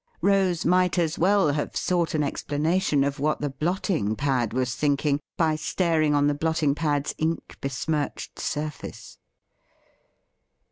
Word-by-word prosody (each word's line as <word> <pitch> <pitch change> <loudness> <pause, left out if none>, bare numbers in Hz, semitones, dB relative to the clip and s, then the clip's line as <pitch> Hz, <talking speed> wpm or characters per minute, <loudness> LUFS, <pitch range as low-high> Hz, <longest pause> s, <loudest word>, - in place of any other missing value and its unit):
Rose 190 -4 +2
might 180 +1 +3
as 165 -2 0
well 190 -3 +4
have 145 +1 -2
sought 170 -3 0
an 150 - +2
explanation 150 +2 0
of 140 0 -2
what 155 +2 0
the 145 -2 -2
blotting 155 - -1
pad 130 -3 0
was 125 0 -1
thinking 145 +1 +1 0.2
by 160 -2 +2
staring 155 -1 +1
on 145 0 +3
the 145 - +3
blotting 155 -1 +1
pad's 145 -1 -1
ink 160 +1 -2
besmirched 145 +2 -3
surface. 150 0 -5
150 Hz, 135 wpm, -25 LUFS, 145-170 Hz, 0.2 s, well